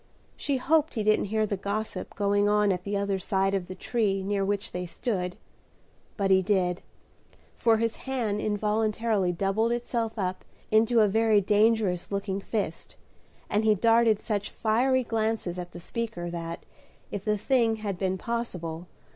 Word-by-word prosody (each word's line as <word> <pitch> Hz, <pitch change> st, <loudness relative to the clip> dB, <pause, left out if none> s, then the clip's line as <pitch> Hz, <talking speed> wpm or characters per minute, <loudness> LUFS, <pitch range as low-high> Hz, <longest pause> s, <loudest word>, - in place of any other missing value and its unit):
She 280 Hz, -2 st, -1 dB
hoped 310 Hz, +3 st, +2 dB
he 220 Hz, -, 0 dB
didn't 215 Hz, 0 st, +3 dB
hear 215 Hz, +2 st, +1 dB
the 205 Hz, -, -2 dB
gossip 200 Hz, +3 st, -4 dB
going 205 Hz, 0 st, +2 dB
on 210 Hz, -1 st, +3 dB
at 180 Hz, -1 st, -3 dB
the 200 Hz, 0 st, -1 dB
other 200 Hz, -1 st, -1 dB
side 195 Hz, +1 st, 0 dB
of 190 Hz, -3 st, -1 dB
the 185 Hz, -, -7 dB
tree 195 Hz, -2 st, 0 dB
near 200 Hz, 0 st, 0 dB
which 200 Hz, 0 st, -2 dB
they 180 Hz, 0 st, -4 dB
stood; 180 Hz, -2 st, -3 dB, 0.8 s
but 195 Hz, -2 st, +1 dB
he 190 Hz, 0 st, +6 dB
did, 185 Hz, -2 st, +1 dB, 0.7 s
for 230 Hz, -1 st, +3 dB
his 230 Hz, 0 st, -1 dB
hand 230 Hz, -6 st, -2 dB
involuntarily 215 Hz, -1 st, +1 dB
doubled 195 Hz, +6 st, 0 dB
itself 235 Hz, -1 st, -2 dB
up 185 Hz, -2 st, -2 dB, 0.3 s
into 225 Hz, +2 st, +4 dB
a 210 Hz, -, +5 dB
very 220 Hz, +1 st, +4 dB
dangerous 205 Hz, -2 st, +2 dB
looking 200 Hz, 0 st, -2 dB
fist, 200 Hz, -6 st, -4 dB, 0.5 s
and 210 Hz, +1 st, +1 dB
he 215 Hz, -1 st, +4 dB
darted 225 Hz, 0 st, +4 dB
such 210 Hz, -2 st, -2 dB
fiery 255 Hz, +4 st, +2 dB
glances 220 Hz, -6 st, -1 dB
at 175 Hz, -1 st, -6 dB
the -, -, -9 dB
speaker, 175 Hz, -3 st, -4 dB
that, 170 Hz, -1 st, -6 dB, 0.5 s
if 200 Hz, -, -4 dB
the 210 Hz, 0 st, +1 dB
thing 230 Hz, 0 st, +2 dB
had 205 Hz, -4 st, -4 dB
been 190 Hz, -1 st, 0 dB
possible. 180 Hz, -8 st, -4 dB
210 Hz, 165 wpm, -27 LUFS, 190-225 Hz, 0.8 s, he